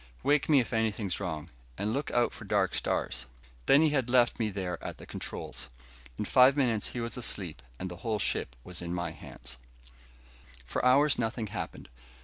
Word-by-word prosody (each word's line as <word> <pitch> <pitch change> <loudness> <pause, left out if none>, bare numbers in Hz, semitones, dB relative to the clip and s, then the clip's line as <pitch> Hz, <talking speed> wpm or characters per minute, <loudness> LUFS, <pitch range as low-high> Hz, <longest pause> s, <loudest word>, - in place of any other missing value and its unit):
"Wake 145 +1 +3
me 145 -3 +7
if 120 - -1
anything's 110 -4 0
wrong. 80 -6 -4 0.3
And 105 +2 -1
look 140 +3 -1
out 120 -1 +2
for - - -9
dark - - +1
stars." 65 +1 -1 0.4
Then 145 +3 +7
he 160 - +5
had 135 -4 +1
left 120 -1 +4
me 110 -2 +1
there 95 -3 -4
at - - -5
the - - -11
controls. - - -4 0.5
In - - -2
five 130 +2 +6
minutes 120 -6 +2
he 120 - -4
was 115 +1 -3
asleep 95 -8 -2 0.2
and 95 - -4
the 90 -1 -7
whole 110 +3 -1
ship 60 -10 0
was 90 -1 -4
in 85 0 -3
my 85 -1 -2
hands. 65 -5 -9 1.1
For - - -2
hours 135 +3 +5
nothing 115 -1 -1
happened. - - -5
110 Hz, 185 wpm, -30 LUFS, 90-125 Hz, 1.1 s, me